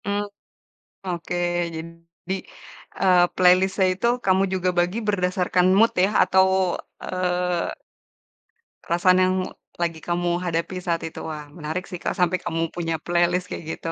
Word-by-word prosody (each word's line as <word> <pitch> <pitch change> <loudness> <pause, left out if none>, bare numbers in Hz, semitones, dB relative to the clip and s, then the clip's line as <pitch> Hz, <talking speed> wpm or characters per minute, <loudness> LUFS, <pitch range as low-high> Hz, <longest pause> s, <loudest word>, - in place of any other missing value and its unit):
Mmm, 205 +1 -1 0.8
oke 175 -1 -3 0.4
jadi, 165 +2 -8 0.7
eee, 180 -2 +5
playlist-nya 185 +1 +4
itu 190 +6 -1 0.2
kamu 190 0 +4
juga 185 -1 +1
bagi 175 +4 +1
berdasarkan 180 -2 +1
mood 225 +2 +5
ya 195 - +4
atau, 190 +1 +4 0.6
eee 180 -1 -1 1.1
perasaan 180 +2 +3
yang 185 0 +3 0.4
lagi 165 -2 -2
kamu 175 +1 -1
hadapi 170 +1 -2
saat 170 -1 -1
itu 160 - -7
wah 150 -2 -6
menarik 165 +3 -4
sih 180 - -5
Kak, - - -1
sampai 180 0 +2
kamu 165 -1 -2
punya 165 -2 -2
playlist 175 +1 +1
kayak - - -6
gitu, 165 - -4
180 Hz, 135 wpm, -23 LUFS, 170-185 Hz, 1.1 s, eee